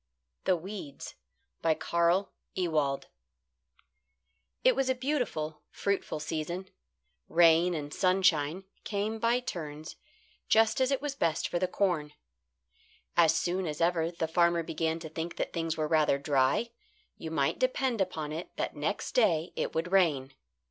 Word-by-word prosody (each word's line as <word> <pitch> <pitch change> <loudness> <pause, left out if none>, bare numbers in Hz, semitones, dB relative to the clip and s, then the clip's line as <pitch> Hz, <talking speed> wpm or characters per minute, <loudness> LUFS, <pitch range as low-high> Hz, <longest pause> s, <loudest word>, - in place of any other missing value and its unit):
THE 185 - +4
WEEDS 175 -5 -7 0.6
CARL 170 +4 +1 0.2
EWALD 155 -6 0 1.6
It - - +5
was 270 -1 +1
a 260 - +2
beautiful, 245 - -2
fruitful 200 -5 -2
season. 170 +5 -4 0.6
Rain 170 +1 +5
and 145 -1 -5
sunshine 180 -3 +2 0.2
came 215 +1 -2
by 235 +2 +2
turns 155 -8 -6 0.5
just 225 +2 +4
as 260 - +3
it 275 0 0
was 290 -2 -2
best 165 - 0
for 175 - -1
the 185 - +1
corn. 175 -6 0 1.0
As 165 -2 +5
soon 175 +2 0
as 150 -1 -4
ever 170 -1 +2
the 170 -1 -3
farmer 170 +1 +3
began 160 0 -1
to 160 - -6
think 165 +2 -5
that - - -3
things 165 -1 -2
were 155 -1 0
rather 155 -3 +3
dry, 140 - +1 0.5
you - - -5
might - - 0
depend 270 - +1
upon 160 -5 -2
it 165 +3 -5
that - - -3
next - - -2
day 170 - +2
it - - -2
would 165 +3 -1
rain. 155 -9 +2
170 Hz, 140 wpm, -30 LUFS, 155-195 Hz, 1.6 s, It